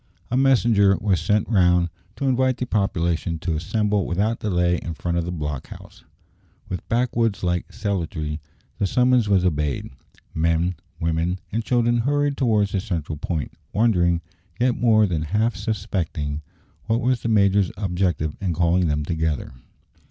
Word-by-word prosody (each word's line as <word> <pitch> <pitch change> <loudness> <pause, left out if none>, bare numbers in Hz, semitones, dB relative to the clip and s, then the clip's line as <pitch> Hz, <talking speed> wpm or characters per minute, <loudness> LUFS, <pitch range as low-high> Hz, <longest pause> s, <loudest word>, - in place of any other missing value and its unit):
A - - +1
messenger 120 -7 +4
was 100 -4 +1
sent 105 -1 +1
round 90 -5 +3 0.3
to 140 - -3
invite 130 0 +2
the 125 - -2
population 85 -6 0
to 80 0 -2
assemble 105 +3 0
without 105 +6 0
delay 90 -3 +1
in 85 0 -5
front 85 +2 -2
of 85 - -2
the 90 - -3
block 75 -5 -4
house. - - -13 0.7
With 90 - -5
backwoods 115 -4 +1
like 90 -1 -1
celerity 80 -6 -3 0.4
the 100 - +2
summons 125 -1 +3
was 95 -2 +3
obeyed; 75 -7 -1 0.4
men, 85 +2 +1 0.3
women, 85 +2 0
and 115 +2 -1
children 120 0 +2
hurried 145 +3 +1
towards 110 -7 +2
the 100 - 0
central 85 -6 -3
point, 80 -1 -3 0.2
wondering, 90 -6 +2 0.4
yet 125 0 +3
more 110 -2 +4
than 85 -6 -1
half 105 +9 0
suspecting, 85 -9 -3 0.4
what 115 +1 +1
was 125 0 +1
the 115 - -2
major's 100 -3 +3
object 90 -5 0
in 85 +3 -3
calling 85 +1 +2
them 75 -1 0
together. 80 -5 -2
95 Hz, 150 wpm, -23 LUFS, 85-115 Hz, 0.7 s, messenger